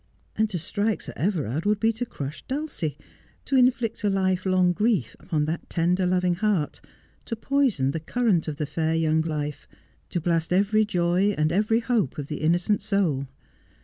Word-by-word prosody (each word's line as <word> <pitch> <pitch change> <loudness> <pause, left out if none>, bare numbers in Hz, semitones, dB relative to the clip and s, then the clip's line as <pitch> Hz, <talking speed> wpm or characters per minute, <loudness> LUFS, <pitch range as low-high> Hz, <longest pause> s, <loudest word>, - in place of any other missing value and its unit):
And 220 0 +1
to 190 - -2
strike 205 +5 -1
Sir - - -6
Everard 160 - -1
would 210 0 +2
be 225 +1 +2
to 240 +2 -4
crush 145 -4 -6
Dulcie, 270 - -3 0.5
to 275 - 0
inflict 245 -4 +2
a 205 - +3
life 190 -1 0
long 185 -1 +3
grief 205 - 0
upon 155 -5 -1
that 160 +2 -4
tender, 180 +2 +1
loving 180 0 +2
heart, 185 -5 0 0.4
to 230 - -3
poison 230 - +1
the 160 - -3
current 195 0 +1
of 155 - -3
the 150 - -2
fair 160 +2 -1
young 160 -1 +2
life, 150 -2 -4 0.4
to 175 - -1
blast 165 0 0
every 205 +4 +3
joy 185 +1 +1
and 155 +1 +2
every 215 +5 +2
hope 230 - 0
of 145 -2 -5
the 150 - -3
innocent 175 +6 +2
soul. 180 -10 0
180 Hz, 180 wpm, -25 LUFS, 160-215 Hz, 0.5 s, a